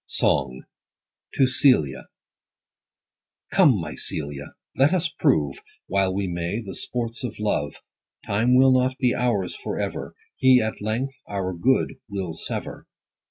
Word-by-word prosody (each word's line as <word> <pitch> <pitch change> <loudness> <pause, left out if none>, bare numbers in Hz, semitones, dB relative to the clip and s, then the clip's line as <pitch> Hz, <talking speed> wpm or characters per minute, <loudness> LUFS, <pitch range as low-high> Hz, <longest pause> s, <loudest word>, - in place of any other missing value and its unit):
V. - - -66
— - - -66
SONG. 65 +1 +1 0.3
— - - -24
TO 135 - +4
CELIA. 125 - +2 1.4
Come, 150 - +5
my 80 -3 -5
CELIA, 70 -1 -3 0.2
let 140 +6 +4
us 175 -1 0
prove, 75 - +1 0.3
While 95 -1 +1
we 100 +1 -1
may, 85 +4 -3
the 100 -5 -7
sports 120 -1 -4
of 120 -3 -5
love; 75 -9 -1 0.5
Time 115 +5 +2
will 130 +1 +6
not 130 0 +2
be 125 -2 +2
ours 105 -7 0
for - - -5
ever: - - -4 0.2
He 130 -1 +5
at 110 -2 -3
length 115 +6 -2
our 95 -2 -3
good 125 +10 +1
will 95 -5 -4
sever. 80 - -5
110 Hz, 150 wpm, -24 LUFS, 90-130 Hz, 1.4 s, will